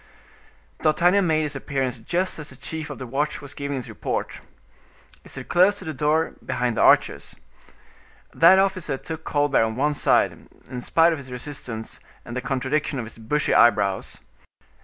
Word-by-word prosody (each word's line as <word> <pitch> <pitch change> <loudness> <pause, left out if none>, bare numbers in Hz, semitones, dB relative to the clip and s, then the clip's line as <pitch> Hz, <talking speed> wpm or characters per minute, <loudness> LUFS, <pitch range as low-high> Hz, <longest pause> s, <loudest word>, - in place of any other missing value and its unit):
D'Artagnan 175 +5 +3
made 155 -1 +2
his 150 -1 -3
appearance 135 -3 -3
just 175 +10 -2
as 150 - -8
the 130 - -13
chief 160 +3 -6
of 145 - -7
the 130 - -6
watch 140 +5 -2
was 145 -1 -11
giving 140 0 -4
his 125 -3 -5
report. - - -4 0.8
He - - -15
stood - - -8
close 185 +4 +4
to 190 - -9
the 160 - -4
door, 150 +4 +1
behind 120 -1 -1
the - - 0
archers. - - +3 1.0
That 170 +3 +7
officer 185 -7 0
took 160 +3 -7
Colbert 145 -4 +2
on 110 0 -2
one 145 +4 +1
side, - - +3 0.4
in 125 -1 -6
spite 165 +6 +4
of 160 - -5
his 130 -2 -11
resistance 125 -3 -6 0.3
and 120 - -7
the 125 - -2
contradiction 135 +3 -1
of 120 - -3
his 115 - -12
bushy 150 +7 0
eyebrows. 100 -5 +3
145 Hz, 175 wpm, -23 LUFS, 125-160 Hz, 1.0 s, That